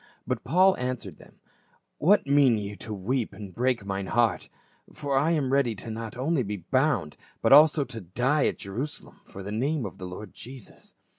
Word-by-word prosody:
But 130 -3 -2
Paul 185 +8 +4
answered 125 - -4
them, - - -18 0.3
" - - -39
What 200 +7 +4
mean 140 -4 +4
ye 105 0 -5
to 110 - -9
weep 110 +5 -2
and 100 -3 -9
break 125 -2 0
mine 95 -1 -3
heart? 120 +2 +1 0.4
for 145 -2 -3
I 145 +4 +3
am 135 -5 0
ready 130 -5 +2
not 110 0 -5
to 135 +2 0
be 105 -1 -4
bound 130 - 0
only, - - -26
but - - +5
also 150 +1 +7
to 115 -4 -8
die 125 - +1
at - - -2
Jerusalem 120 +10 -6
for 100 - -10
the 100 - -6
name 135 +4 -1
of 95 - -8
the 95 - -6
Lord 95 +3 -9
Jesus." 125 -2 -11
125 Hz, 195 wpm, -27 LUFS, 105-140 Hz, 0.4 s, also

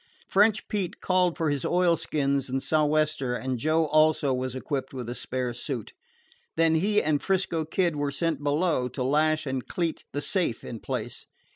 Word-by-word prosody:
French 210 +2 +3
Pete 195 -4 -3
called 180 -2 +1
for 160 -3 +1
his 145 -2 -1
oilskins 150 -6 +1
and 135 +1 0
sou'wester, 150 -4 +1
and 130 -1 -3
Joe 155 +4 +2
also 155 -2 +3
was 130 0 -2
equipped 135 0 -4
with 125 -3 -5
a 120 - -3
spare 125 -1 -3
suit. 120 -1 -5 0.6
Then 165 -1 +4
he 205 +6 +2
and 150 -2 +1
'Frisco 185 -4 0
Kid 170 0 0
were 145 -1 -1
sent 160 +1 -1
below 145 -2 +1
to 125 0 -4
lash 155 +3 +2
and 130 -2 -3
cleat 170 -3 -2
the 145 - -2
safe 175 - -1
in 115 - -7
place. - - -5
155 Hz, 170 wpm, -27 LUFS, 130-165 Hz, 0.6 s, Then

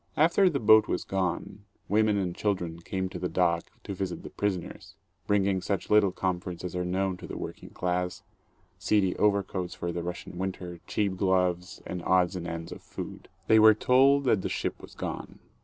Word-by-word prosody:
After 170 +5 +5
the 145 -5 -1
boat 110 -1 +6
was - - -1
gone, 95 +1 -2 0.2
women 105 0 +3
and 90 -3 -1
children 90 -5 -2
came 95 +2 -3
to 90 - -7
the 90 0 -2
dock 85 -2 +1 0.2
to 100 - -5
visit 95 -2 -4
the - - -8
prisoners, 95 0 -3 0.3
bringing 100 -2 +2
such 100 0 -2
little 105 -2 +5
comforts 90 -1 -3
as 90 -1 -5
are 90 - -1
known 95 +1 -1
to - - -9
the - - -6
working - - -7
class, 90 0 -2 0.6
seedy 100 -4 +2
overcoats 100 -3 0
for 85 - -3
the 85 0 -3
Russian 90 +1 -6
winter, 90 -2 -4
cheap 100 -3 0
gloves 90 -1 0
and 90 -1 -5
odds 90 +1 +2
and 85 -1 -4
ends 85 -1 -5
of - - -8
food. - - -8 0.2
They 110 - +6
were 110 0 +8
told 135 +5 +4
that 110 -7 +3
the - - -3
ship - - -3
was - - -13
gone. - - -5
95 Hz, 190 wpm, -28 LUFS, 90-105 Hz, 0.6 s, were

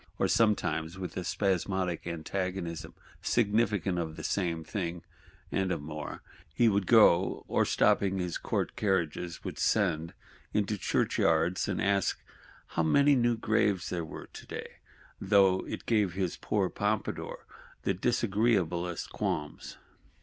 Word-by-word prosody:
Or - - +2
sometimes, 95 -6 +1
with 95 -1 -6
a 90 - -3
spasmodic 95 -3 -1
antagonism, 85 0 -4 0.3
significant 105 -5 +1
of 80 -2 -3
the - - -8
same 85 -4 -1
thing, 85 0 -4 0.5
and 95 -1 0
of - - -1
more, 75 +1 -7 0.3
he 115 +10 +3
would 100 -3 +2
go; 95 -6 +5
or - - +2
stopping 95 -1 +2
his 90 -2 -2
court - - -2
carriages, 90 -4 -1
would - - -6
send 80 +1 +1 0.4
into 105 0 +1
churchyards, 85 -2 +1
and 100 -3 -1
ask 100 -2 +1 0.5
"how - - 0
many 140 - +4
new 120 -2 +2
graves 110 -4 +1
there 85 -2 -2
were 80 - -8
today," - - -8 0.4
though 95 -2 +4
it - - -6
gave 105 -6 +2
his 95 -2 -1
poor 100 -3 0
Pompadour 105 +1 -2 0.4
the - - +1
disagreeablest 95 -5 0
qualms. 75 -1 -3
95 Hz, 130 wpm, -30 LUFS, 85-105 Hz, 0.5 s, go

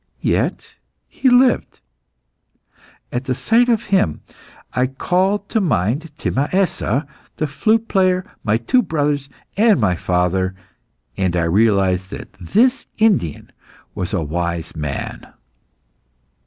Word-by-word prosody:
Yet - - -1 0.3
he 265 - +1
lived. 250 0 +3 1.3
At 120 +2 -3
the 130 -2 -1
sight 240 - +2
of 230 -1 +2
him 90 - +2 0.5
I 125 +1 +1
called 190 +9 0
to 220 - +1
mind 135 - 0
Timaessa, 145 - 0 0.3
the 155 - 0
flute 220 +10 +1
player, 185 -2 +2 0.2
my 110 +1 +2
two 185 - +2
brothers, 145 - -1 0.3
and 215 - +4
my 95 -5 +2
father, 90 +2 0 0.6
and 95 -2 0
I 85 - +1
realised 95 0 +2
that - - -9
this 240 - +2
Indian 205 - +1 0.4
was 90 - -4
a 95 -5 -1
wise 85 +2 -3
man. 75 -3 -5
135 Hz, 115 wpm, -19 LUFS, -, 1.3 s, and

